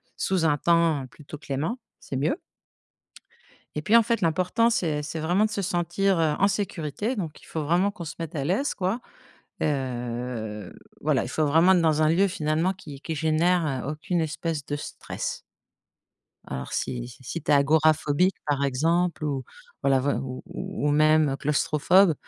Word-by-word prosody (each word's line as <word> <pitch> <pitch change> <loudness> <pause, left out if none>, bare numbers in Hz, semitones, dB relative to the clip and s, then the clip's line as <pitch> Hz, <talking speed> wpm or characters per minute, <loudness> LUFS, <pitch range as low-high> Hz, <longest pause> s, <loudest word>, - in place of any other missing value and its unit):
sous 185 -3 0
un 145 -2 +3
temps 165 -4 +2
plutôt 150 +1 -11
clément, 145 - -3 0.2
c'est - - -7
mieux 150 - 0 1.4
et 150 - -1
puis, 215 +9 +3
en 230 - +8
fait, 230 0 0
l'important 185 +7 +2
c'est 165 -10 0
c'est 150 +2 -5
vraiment 180 +7 +2
de - - -1
se 205 - -2
sentir, 175 +1 +1
heu, 155 -2 +2
en 200 - +5
sécurité. 200 - -2
Donc 165 -7 -5
il - - -17
faut 160 - -4
vraiment 175 +6 +2
qu'on 175 - -8
se 150 - -6
mette 165 -2 -5
à 140 - -1
l'aise, 195 - 0
quoi, 190 +5 -1 0.6
heu, 120 - -3 0.3
voilà, - - +2
il - - -5
faut 155 - +1
vraiment 165 +5 +5
être 180 - +4
dans 155 -1 +2
un 155 - +4
lieu 185 +5 +4
finalement 160 +1 0
qui 150 -7 -11
qui 160 - -4
génère, 160 +3 +2 0.2
heu, - - -1
aucune 165 +3 -1
espèce 160 -1 -3
de 145 - -3
stress 145 - -5 1.1
alors 65 0 -6
si 120 -1 -2
si 125 +1 -14
si 165 +6 -5
tu - - -1
es - - +7
agora 155 +3 +5
phobique, 155 +5 +1
par 145 -1 0
exemple 165 +6 +1
ou, 140 -3 -1 0.4
voilà, 135 -1 +3 0.2
ou 130 -1 -6
ou 185 -4 -3
même, 155 0 +4
heu, 135 - -2
claustrophobe, 155 +5 +3
155 Hz, 180 wpm, -26 LUFS, 145-180 Hz, 1.4 s, en